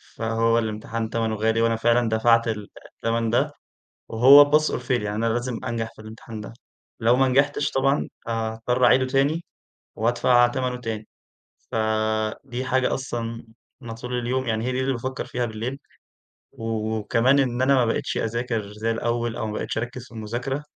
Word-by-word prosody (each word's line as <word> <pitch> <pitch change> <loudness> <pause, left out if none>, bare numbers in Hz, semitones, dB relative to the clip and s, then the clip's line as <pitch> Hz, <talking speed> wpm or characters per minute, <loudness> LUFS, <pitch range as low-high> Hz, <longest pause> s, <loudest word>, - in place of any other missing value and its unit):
فهو 115 0 +1
الامتحان 110 0 -3
تمنه 115 -1 -1
غالي، 110 +1 +1
وأنا 115 0 +2
فعلًا 120 +1 +2
دفعت 115 +1 +3
ال 105 -3 -3 0.3
التمن 115 0 -1
ده، 120 - +1 0.6
وهو 140 +5 +8
pass 150 +1 +6
or - - -2
fail - - -2
يعني 105 0 -3
أنا 115 +2 -1
لازم 120 +1 -3
أنجح 115 -2 -3
في - - -13
الامتحان 110 0 -9
ده، 105 - -9 0.5
لو 115 +2 +4
ما 135 +1 +3
نجحتش 140 +2 +2
طبعًا 135 +2 +1 0.2
آآ - - -2
هاضطر 115 +2 0
أعيده 130 0 +5
تاني، 140 +5 +1 0.5
وأدفع 120 +2 +3
تمنه 125 0 -2
تاني. 110 -2 -5 0.6
ف - - -7 0.7
دي 130 -1 -4
حاجة 130 0 +1
أصلًا 115 -3 -4 0.4
م 120 -4 -7
طول 125 +2 -4
اليوم، 130 +2 -1
يعني 110 -1 -1
هي 130 - -1
دي 130 - -1
اللي 130 +1 0
بافكر 130 +2 -4
فيها 125 -1 -2
بالليل 115 +4 -5 0.7
و 110 -1 -3
وكمان 120 +5 +2
إن 125 -2 +1
أنا 135 +1 +4
ما 130 -2 +4
بقيتش 115 - -1
أذاكر 115 -2 -2
زي 110 +2 -2
الأول 115 0 -1
أو - - -3
ما 105 - -4
بقيتش 105 - -3
أركز 120 +1 -5
في - - -28
المذاكرة، 120 +6 -4
115 Hz, 175 wpm, -24 LUFS, 115-130 Hz, 0.7 s, وهو